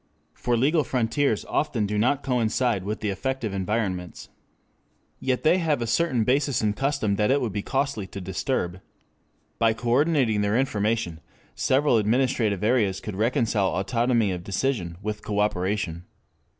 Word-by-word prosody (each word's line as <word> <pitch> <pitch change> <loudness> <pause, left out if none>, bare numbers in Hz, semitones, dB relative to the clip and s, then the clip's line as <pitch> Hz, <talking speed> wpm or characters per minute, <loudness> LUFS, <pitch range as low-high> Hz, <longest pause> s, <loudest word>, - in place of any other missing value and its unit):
For 120 -1 -1
legal 150 +6 +3
frontiers 120 -1 0
often 120 -8 0
do 105 +1 -2
not 125 +7 +1
coincide 120 -4 0
with 105 +2 -3
the 105 - -1
effective 130 0 -3
environments. 95 -2 -3 0.9
Yet 130 -1 -1
they 175 +4 +4
have 155 -5 +1
a 120 - -1
certain 125 -1 +1
basis 135 +1 +1
in 105 -3 +1
custom 135 -5 0
that 105 +2 +2
it 140 +2 +3
would 120 -5 -2
be 100 +1 -2
costly 135 -5 -2
to 100 - -8
disturb. 95 -1 -2 0.8
By 115 -1 +4
coordinating 125 -1 +2
their 105 +2 +1
information 110 -8 0 0.3
several 135 -2 +2
administrative 110 -3 +1
areas 105 -4 +2
could 105 - -6
reconcile 110 -3 +1
autonomy 115 +1 +1
of 90 -1 -4
decision 95 -4 -2
with 105 0 -3
cooperation. 100 -4 -1
115 Hz, 145 wpm, -25 LUFS, 100-130 Hz, 0.9 s, they